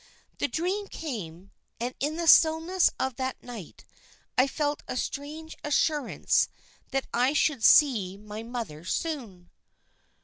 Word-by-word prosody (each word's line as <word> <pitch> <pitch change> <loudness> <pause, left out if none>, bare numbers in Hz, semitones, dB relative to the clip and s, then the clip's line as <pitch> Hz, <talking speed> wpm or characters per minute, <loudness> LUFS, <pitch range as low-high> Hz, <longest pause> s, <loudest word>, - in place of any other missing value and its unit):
The - - +1
dream 380 +5 -2
came, 195 - -7 0.3
and 245 +2 -2
in 295 +3 -1
the 340 0 -2
stillness 325 +4 +5
of 260 -2 -1
that 260 -1 -3
night 230 -9 -10 0.5
I 255 +2 +4
felt 295 +1 -1
a - - -3
strange 305 +5 -5
assurance 295 -1 +1 0.4
that 270 0 -1
I 250 +4 +3
should 290 -5 +1
see 210 -10 +5
my 210 +1 -8
mother 230 -10 -6
soon." 210 - -4
265 Hz, 130 wpm, -28 LUFS, 220-310 Hz, 0.5 s, stillness